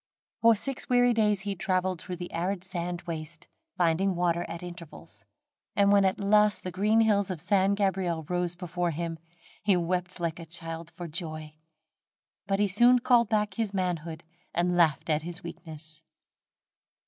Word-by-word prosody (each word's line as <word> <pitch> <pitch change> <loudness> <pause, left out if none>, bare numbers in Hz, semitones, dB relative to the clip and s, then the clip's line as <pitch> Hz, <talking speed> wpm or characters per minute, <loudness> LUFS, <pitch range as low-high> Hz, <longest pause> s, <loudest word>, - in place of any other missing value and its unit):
For 230 0 +6
six 270 +5 -4
weary 245 -1 +4
days 210 -3 +2
he 200 0 -2
traveled 185 -1 -1
through 180 - -5
an 175 - -3
arid 180 +2 -2
sandy 175 -2 -3
waste, 160 -1 -6 0.3
finding 180 +2 +2
water 175 0 +1
at 170 +1 -6
intervals; 175 -3 -10 0.5
and 200 0 +4
when 200 -1 +5
at 190 - +1
last 210 +1 +4
the 185 - -4
green 210 +5 +3
hills 205 -3 +2
of 180 -4 -4
San 195 +3 +2
Gabriel 190 -5 0
rose 180 -1 -1
before 175 -1 -2
him, 165 0 -4 0.4
he 200 -3 +3
wept 180 +1 -2
like 170 -1 -2
a 165 - -8
child 165 0 -6
for 175 0 -8
joy; 155 -2 -5 0.9
but 195 0 +1
he 205 0 +2
soon 240 +6 +5
called 240 -2 +3
back 210 -2 +1
his 205 -1 -2
manhood 170 -3 -2 0.3
and 175 +1 +1
laughed 165 -4 +3
at 155 -1 +1
his 175 +4 -7
weakness. 155 -2 -8
180 Hz, 165 wpm, -28 LUFS, 170-200 Hz, 0.9 s, For